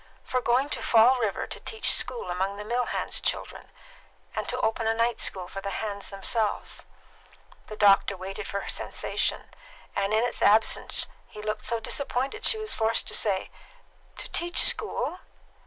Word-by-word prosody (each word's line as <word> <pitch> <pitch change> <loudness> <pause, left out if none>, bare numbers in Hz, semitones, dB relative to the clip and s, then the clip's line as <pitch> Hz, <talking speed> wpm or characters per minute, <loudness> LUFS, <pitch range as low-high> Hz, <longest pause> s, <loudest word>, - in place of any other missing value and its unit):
"For 255 - -1
going 250 +4 +2
to - - -1
Fall 235 +3 +5
River 215 -4 -1
to - - -6
teach 445 0 0
school 475 - +1
among 190 +3 -2
the 210 - -7
mill 240 +2 0
hands' - - -1
children! - - -3 0.7
And - - -3
to - - -2
open 225 0 0
a 225 - +2
night 230 0 +1
school 185 -2 0
for 195 - -7
the 200 - -4
hands 200 0 -3
themselves." 210 +2 -2 0.8
The 215 - -7
doctor 200 -1 +4
waited 190 +1 -6
for 200 - -3
her - - -8
sensation, - - -1 0.4
and 200 0 0
in 220 +2 +3
its 245 - -2
absence 220 +2 +4 0.2
he 210 - -10
looked 215 0 -3
so 235 -1 +1
disappointed 270 - -2
that - - +5
she 440 - +4
was 435 0 -2
forced 225 0 0
to - - -5
say, 195 -3 +1 0.7
"To - - -7
teach 345 +1 +1
school?" 360 - +1
220 Hz, 175 wpm, -27 LUFS, 200-245 Hz, 0.8 s, Fall